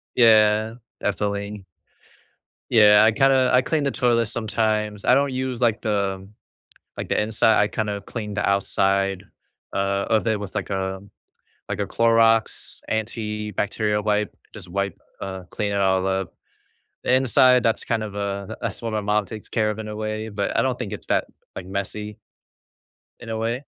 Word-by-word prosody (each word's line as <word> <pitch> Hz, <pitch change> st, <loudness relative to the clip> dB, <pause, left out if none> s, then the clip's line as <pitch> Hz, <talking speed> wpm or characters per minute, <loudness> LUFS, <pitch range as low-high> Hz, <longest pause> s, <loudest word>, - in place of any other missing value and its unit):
Yeah, 110 Hz, -1 st, +5 dB, 0.2 s
definitely. 100 Hz, 0 st, -3 dB, 1.1 s
Yeah, 105 Hz, -2 st, +7 dB
I 110 Hz, -, +6 dB
kinda 130 Hz, +2 st, +3 dB
I 125 Hz, -, +6 dB
clean 155 Hz, +1 st, 0 dB
the 140 Hz, -, +1 dB
toilet 120 Hz, -3 st, +2 dB
sometimes. 110 Hz, -2 st, -1 dB
I 125 Hz, -, +5 dB
don't 140 Hz, 0 st, +2 dB
use 130 Hz, -1 st, -3 dB
like 115 Hz, -3 st, +1 dB
the 100 Hz, -3 st, -1 dB, 0.7 s
like -, -, -5 dB
the -, -, +1 dB
inside. 110 Hz, +1 st, +3 dB
I 105 Hz, -, +3 dB
kinda 105 Hz, -2 st, -2 dB
clean 105 Hz, -1 st, -6 dB
the -, -, -1 dB
outside, 100 Hz, -1 st, +1 dB, 0.5 s
uh, 100 Hz, 0 st, 0 dB
of 110 Hz, 0 st, +2 dB
it 110 Hz, -2 st, +1 dB
was 100 Hz, -3 st, -7 dB
like -, -, -3 dB
a 95 Hz, -1 st, -2 dB, 0.7 s
like -, -, -2 dB
a -, -, 0 dB
Clorox 115 Hz, -1 st, +2 dB
antibacterial 105 Hz, -1 st, -2 dB
wipe, 105 Hz, -1 st, 0 dB, 0.2 s
just 100 Hz, -5 st, -9 dB
wipe 100 Hz, +1 st, -2 dB, 0.2 s
uh, 95 Hz, -1 st, -5 dB
clean 105 Hz, -1 st, -2 dB
it -, -, -1 dB
all 95 Hz, -1 st, +2 dB
up. 95 Hz, 0 st, -2 dB, 0.7 s
The -, -, +2 dB
inside, 130 Hz, -1 st, +5 dB
that's 115 Hz, -, 0 dB
kind 115 Hz, -2 st, -1 dB
of 105 Hz, -2 st, -6 dB
a 100 Hz, -1 st, -4 dB
that's -, -, -4 dB
what 115 Hz, -, -3 dB
my 110 Hz, -1 st, -1 dB
mom 105 Hz, 0 st, +1 dB
takes 105 Hz, +3 st, -9 dB
care 110 Hz, -2 st, +1 dB
of 105 Hz, 0 st, -4 dB
in 110 Hz, -, -5 dB
a 105 Hz, -, -6 dB
way, 110 Hz, 0 st, -3 dB
but 100 Hz, -1 st, -2 dB
I -, -, +4 dB
don't 130 Hz, -1 st, 0 dB
think 115 Hz, -6 st, -5 dB
it's -, -, -8 dB
that, -, -, +1 dB, 0.3 s
like, 90 Hz, -, -6 dB
messy 100 Hz, +2 st, -5 dB, 1.0 s
in 120 Hz, -, -9 dB
a 110 Hz, -, -2 dB
way. 115 Hz, +5 st, -2 dB
105 Hz, 170 wpm, -23 LUFS, 100-115 Hz, 1.1 s, Yeah